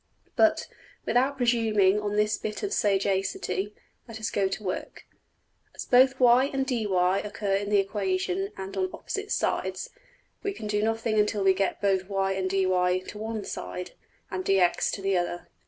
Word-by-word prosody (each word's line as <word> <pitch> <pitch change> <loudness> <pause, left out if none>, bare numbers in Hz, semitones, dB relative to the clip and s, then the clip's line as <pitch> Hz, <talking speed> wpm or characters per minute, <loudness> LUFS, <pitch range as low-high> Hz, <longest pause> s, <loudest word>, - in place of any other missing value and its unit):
But, 325 -1 +3 0.4
without 265 +3 +2
presuming 220 -5 +3
on 205 0 -2
this 210 +1 +2
bit 210 0 -5
of 410 0 -1
sagacity, 195 0 0 0.3
let 225 -2 -8
us 220 - -3
go 200 -1 +1
to 190 +3 -5
work. 185 - -5 0.7
As - - -6
both 260 +1 +5
$y$~and~$dy$ 240 -7 +3
occur 210 -1 -3
in 200 +1 0
the 210 - +4
equation 370 - -1
and 190 0 -6
on 375 0 0
opposite 410 +1 -5
sides, - - -1 0.5
we 400 -1 -2
can 220 - -8
do 210 0 0
nothing 225 0 0
until 210 -1 +1
we 190 0 +5
get 195 +2 -2
both 190 -1 +1
$y$~and~$dy$ 190 -2 +1
to - - -8
one 220 -1 -4
side, 180 0 -6 0.4
and 185 0 -3
$dx$~to 190 0 +2
the 195 0 +1
other. 175 0 -4
210 Hz, 155 wpm, -27 LUFS, 195-235 Hz, 0.7 s, both